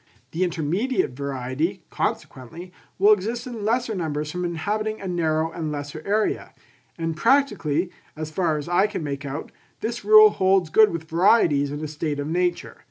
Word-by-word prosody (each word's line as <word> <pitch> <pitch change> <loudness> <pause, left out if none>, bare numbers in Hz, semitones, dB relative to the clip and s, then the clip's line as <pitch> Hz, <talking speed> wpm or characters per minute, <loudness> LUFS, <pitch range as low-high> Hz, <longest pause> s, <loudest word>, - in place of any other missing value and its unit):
The 170 +3 -1
intermediate 180 - -1
variety, 140 +7 -3
consequently, 155 +6 -4 0.2
will 205 +3 +6
exist 225 +4 -3
in 235 -4 -6
lesser 235 +1 0
numbers 155 -5 -3
from 180 +2 -4
inhabiting 210 +6 -2
a 195 - -6
narrow 160 -2 0
and 160 -3 -4
lesser 145 +1 -6
area; 210 +2 -1 0.4
and 165 -1 -2
practically, 180 - +1 0.2
as 155 0 -6
far 160 -2 0
as 150 - -6
I 175 +4 +3
can 210 -5 -5
make 140 -1 -4
out, 140 +3 -6 0.3
this 235 +2 -3
rule 430 0 +8
holds 190 -3 +2
good 220 +3 +6
with 170 -1 -4
varieties 165 -5 +3
in 145 +1 -5
a - - -2
state 150 -1 -3
of 145 - -2
nature. 175 +3 -1
170 Hz, 165 wpm, -23 LUFS, 150-210 Hz, 0.4 s, rule